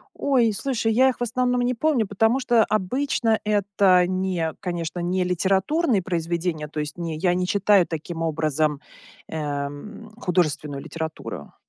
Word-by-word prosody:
Ой, 250 Hz, -5 st, +2 dB
слушай, 230 Hz, 0 st, -1 dB
я 260 Hz, +4 st, +5 dB
их, 255 Hz, -, -3 dB
в -, -, -17 dB
основном, 250 Hz, +1 st, 0 dB
не 245 Hz, +1 st, +1 dB
помню, 255 Hz, -2 st, +1 dB
потому 225 Hz, +6 st, +2 dB
что, 240 Hz, -3 st, +3 dB
обычно, 220 Hz, +2 st, 0 dB
это 200 Hz, -3 st, +3 dB
не 185 Hz, -3 st, -1 dB
конечно, 175 Hz, -2 st, -4 dB
не 180 Hz, +2 st, 0 dB
литературные 195 Hz, -, +1 dB
произведения, 170 Hz, -2 st, -2 dB
то 150 Hz, +1 st, -6 dB
есть 150 Hz, +2 st, -6 dB
не 165 Hz, -2 st, -4 dB
я 175 Hz, +2 st, +2 dB
не 180 Hz, 0 st, -1 dB
читаю 200 Hz, -2 st, +3 dB
таким 165 Hz, +1 st, -5 dB
образом, 155 Hz, -2 st, 0 dB, 0.5 s
эм, 145 Hz, +8 st, -5 dB
художественную 155 Hz, -, -1 dB
литературу. 160 Hz, -, -6 dB
185 Hz, 145 wpm, -24 LUFS, 160-225 Hz, 0.5 s, я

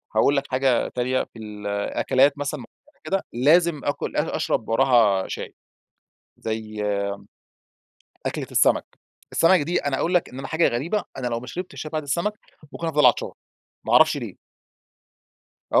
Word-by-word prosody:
هاقول 145 Hz, -, +4 dB
لك 140 Hz, -, +1 dB
حاجة 130 Hz, -2 st, +2 dB
تانية، 125 Hz, +1 st, -1 dB
في 115 Hz, -, -12 dB
ال 105 Hz, -1 st, -7 dB
الأكلات 130 Hz, +7 st, +2 dB
مثلًا 145 Hz, +1 st, -3 dB
معينة 280 Hz, -, -17 dB
كده، 195 Hz, 0 st, -1 dB
لازم 155 Hz, +5 st, +3 dB
آكل 145 Hz, -, -2 dB
أ -, -, 0 dB
أشرب -, -, -1 dB
وراها 115 Hz, -6 st, +3 dB
شاي، -, -, -6 dB, 0.8 s
زي 110 Hz, -1 st, -4 dB, 1.4 s
أكلة -, -, -3 dB
السمَك. -, -, +3 dB, 0.5 s
السمَك 180 Hz, +3 st, +5 dB
دي 170 Hz, +5 st, 0 dB
أنا 140 Hz, -2 st, 0 dB
أقول 175 Hz, -, 0 dB
لك 180 Hz, -, +2 dB
إن 130 Hz, -, -9 dB
أنا 135 Hz, -, -5 dB
حاجة 160 Hz, +1 st, +2 dB
غريبة، 165 Hz, -, -1 dB
أنا 130 Hz, -2 st, -2 dB
لو 115 Hz, -1 st, -2 dB
ما 125 Hz, -, -11 dB
شربتش 180 Hz, +5 st, -6 dB
شاي 155 Hz, -, -6 dB
بعد 155 Hz, -1 st, -2 dB
السمَك، 170 Hz, +9 st, -1 dB, 0.4 s
ممكن 165 Hz, -, -4 dB
أفضَل 150 Hz, -3 st, +3 dB
عطشان 125 Hz, -, +3 dB, 0.5 s
ما -, -, 0 dB
أعرفش -, -, +6 dB
ليه. -, -, -7 dB, 1.3 s
آه، -, -, +6 dB
135 Hz, 160 wpm, -24 LUFS, 120-165 Hz, 1.4 s, أعرفش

